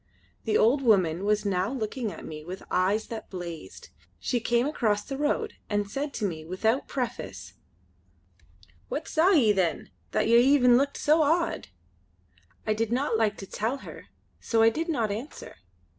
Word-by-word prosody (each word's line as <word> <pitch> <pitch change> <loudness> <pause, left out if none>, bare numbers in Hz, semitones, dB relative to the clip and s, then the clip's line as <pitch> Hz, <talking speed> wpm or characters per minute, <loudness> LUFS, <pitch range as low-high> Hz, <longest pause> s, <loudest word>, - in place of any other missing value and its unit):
The 220 -2 +2
old 255 +6 +4
woman 190 -7 +3
was 210 0 +1
now 190 +1 0
looking 230 -2 -3
at - - -10
me 155 -1 -8
with 180 +4 -8
eyes 195 +4 +1
that 225 -1 -7
blazed. 170 - -8 0.3
She 245 - -1
came 240 +1 +1
across 215 -8 0
the 275 - -5
road 295 +2 -1 0.2
and 205 -1 0
said 280 +8 -3
to 215 - -1
me 160 -5 -4
without 220 - 0
preface: 245 -3 -5 1.4
"What - - -4
saw 330 +3 +3
ye 275 - +5
then, 185 -5 -1 0.2
that - - 0
yer 235 +1 +6
e'en 250 -1 +5
looked 280 +3 +1
so 310 +2 +3
awed?" 330 +3 +1 1.0
I 215 - +2
did 225 +1 -2
not 255 0 +1
like 220 -2 +1
to 195 - -7
tell 225 +7 -2
her - - -10 0.3
so 225 -1 +2
I 225 - +7
did 325 +8 -3
not 230 -9 0
answer. 235 +9 -7
225 Hz, 170 wpm, -27 LUFS, 200-270 Hz, 1.4 s, I